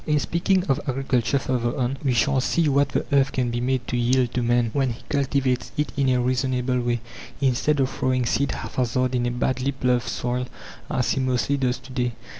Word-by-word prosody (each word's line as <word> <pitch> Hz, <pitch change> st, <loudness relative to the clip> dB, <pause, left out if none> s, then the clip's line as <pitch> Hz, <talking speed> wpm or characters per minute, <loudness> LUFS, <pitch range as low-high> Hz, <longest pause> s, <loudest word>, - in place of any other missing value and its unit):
In 150 Hz, -1 st, +3 dB
speaking 180 Hz, +5 st, +1 dB
of 135 Hz, -2 st, +1 dB
agriculture 130 Hz, -1 st, +1 dB
further 125 Hz, -3 st, -1 dB
on, 130 Hz, 0 st, 0 dB
we 135 Hz, -, +2 dB
shall 135 Hz, +2 st, +2 dB
see 165 Hz, +4 st, +1 dB
what 140 Hz, 0 st, +3 dB
the -, -, -1 dB
earth 140 Hz, 0 st, +3 dB
can 125 Hz, -2 st, -1 dB
be 120 Hz, 0 st, -2 dB
made 130 Hz, 0 st, -1 dB
to -, -, -2 dB
yield 120 Hz, +1 st, +2 dB
to 125 Hz, -, 0 dB
man 120 Hz, -1 st, +2 dB
when 135 Hz, -4 st, +1 dB
he 120 Hz, +2 st, -13 dB
cultivates 135 Hz, -3 st, 0 dB
it 150 Hz, -4 st, 0 dB
in 140 Hz, -1 st, +2 dB
a 125 Hz, -1 st, +3 dB
reasonable 125 Hz, 0 st, 0 dB
way, 120 Hz, -1 st, -1 dB, 0.4 s
instead 140 Hz, +2 st, +1 dB
of 135 Hz, -, +3 dB
throwing 130 Hz, -1 st, 0 dB
seed 140 Hz, +3 st, +1 dB
haphazard 125 Hz, 0 st, -1 dB
in 120 Hz, -1 st, +1 dB
a -, -, +1 dB
badly 130 Hz, +2 st, -1 dB
ploughed 125 Hz, -2 st, +1 dB
soil 125 Hz, +2 st, -2 dB, 0.4 s
as 125 Hz, -2 st, 0 dB
he -, -, 0 dB
mostly 130 Hz, +1 st, +1 dB
does 125 Hz, -3 st, 0 dB
to 130 Hz, +1 st, -14 dB
day. 125 Hz, -2 st, -1 dB
130 Hz, 210 wpm, -24 LUFS, 125-135 Hz, 0.4 s, In